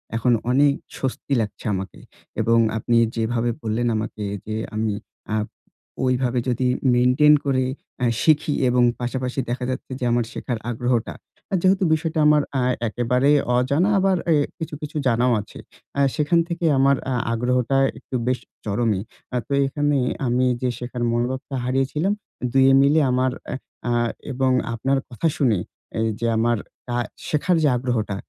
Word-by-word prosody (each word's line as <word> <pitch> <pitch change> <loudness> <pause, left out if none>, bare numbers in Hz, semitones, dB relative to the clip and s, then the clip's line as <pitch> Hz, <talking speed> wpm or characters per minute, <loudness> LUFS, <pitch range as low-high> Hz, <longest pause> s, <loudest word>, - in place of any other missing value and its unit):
এখন 120 +2 +2 0.2
অনেক 140 +2 +4 0.3
স্বস্তি 135 +1 -4
লাগছে 105 - -6
আমাকে। 95 0 -5 0.4
এবং 115 0 +3 0.2
আপনি 115 +2 +1 0.2
যেভাবে 115 +1 0
বললেন 115 +1 -1
আমাকে 110 0 -4 0.2
যে, 110 - -4 0.2
আমি 110 -1 0 0.4
আ - - +1 0.7
ঐভাবে 125 -1 +1
যদি 125 +1 0 0.3
মেইনটেইন 130 +5 +5
করে 130 -2 +2 0.4
এ - - +4 0.2
শিখি 155 -1 +3 0.2
এবং 125 0 +3 0.2
পাশাপাশি 125 +1 -2
দেখা 125 +1 -2
যাচ্ছে 130 - -5
যে, - - -5
আমার 120 -1 +2
শেখার 120 - -3
আগ্রহটা 120 0 -1 0.4
আ - - +2
যেহেতু 190 +1 +3
বিষয়টা 160 0 -1
আমার 150 0 +5 0.2
আ - - +1 0.2
একেবারে 125 +5 +1 0.3
অজানা, 140 +10 +2
আবার 190 -1 +3 0.2
এ - - +5 0.2
কিছু, 160 -2 -5
কিছু 150 0 -5
জানাও 125 +1 +3
আছে। - - -13 0.4
আ - - +3
সেখান 155 +3 +2
থেকে 170 -1 -3
আমার 140 +1 +5 0.2
আ - - +1 0.2
আগ্রহটা 125 +2 +1 0.2
একটু - - -8
বেশ 125 0 +1 0.3
চরমই। 105 -1 0 0.3
আ - - +2
তো - - -2
এখানে 145 +1 0 0.3
আমি 125 +1 +2 0.2
যে, 130 - +1
শেখার 125 0 -4
মনোভাবটা 130 +4 -2
হারিয়েছিলাম, 135 +9 0 0.4
দুয়ে 135 +1 +5
মিলে 145 +3 +4
আমার 130 +1 +2 0.2
এ - - -2 0.3
আ - - +1 0.4
এবং 130 0 +1 0.2
আপনার 135 +4 0
কথা 125 +7 -1
শুনে 120 -7 +3 0.4
এইযে 115 +1 -1
আমার 120 +1 +2 0.4
আ - - +1 0.3
শেখার 160 +4 +2
যে, - - +5
আগ্রহটা, 120 -5 -1
125 Hz, 155 wpm, -22 LUFS, 120-140 Hz, 0.7 s, মেইনটেইন